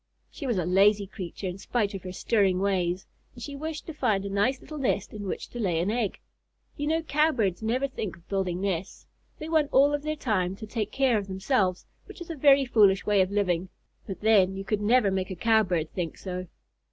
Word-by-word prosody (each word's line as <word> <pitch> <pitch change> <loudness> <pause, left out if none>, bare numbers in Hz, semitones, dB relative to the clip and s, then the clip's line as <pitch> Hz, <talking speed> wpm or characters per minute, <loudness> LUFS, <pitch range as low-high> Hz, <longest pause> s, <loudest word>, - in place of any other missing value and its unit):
She 280 - -6
was 235 -5 0
a 175 - 0
lazy 200 +3 +4
creature 190 -1 -7
in 185 +1 -4
spite 210 -1 -1
of 195 - -5
her 185 - -7
stirring 195 -1 +1
ways, 185 -2 0 0.3
and 240 - -9
she 285 +4 -6
wished 310 +2 -5
to 325 - -7
find 200 -9 0
a - - -3
nice 225 +7 +1
little 305 -1 -8
nest 210 -7 -1
in 205 -2 -6
which - - -4
to 240 - -7
lay 180 -7 0
an 180 +5 0
egg. 225 -4 -1 0.6
You 295 -1 -3
know 325 +1 +1
Cowbirds 280 - +1
never 245 +5 0
think 215 -8 -5
of 170 - -24
building 190 -2 -1
nests. 190 -2 -3 0.3
They 310 - -7
want 315 -3 +2
all 280 +2 +5
of 290 - -1
their 305 +1 -2
time 195 -10 -1
to 220 - -8
take 215 -1 -3
care 260 -5 +2
of 200 - -7
themselves, 190 -1 0 0.2
which - - -12
is 345 -1 -7
a - - -4
very 275 -1 +5
foolish 205 -5 +4
way 205 -2 +3
of 185 - +1
living; 185 -3 0 0.4
but 195 - -6
then, 200 -3 +4
you 195 - -5
could 210 0 -1
never 210 -1 +3
make 190 -1 -1
a 185 - -4
Cowbird 185 -6 +1
think 170 -4 -4
so! 185 -1 -5
205 Hz, 225 wpm, -27 LUFS, 190-255 Hz, 0.6 s, all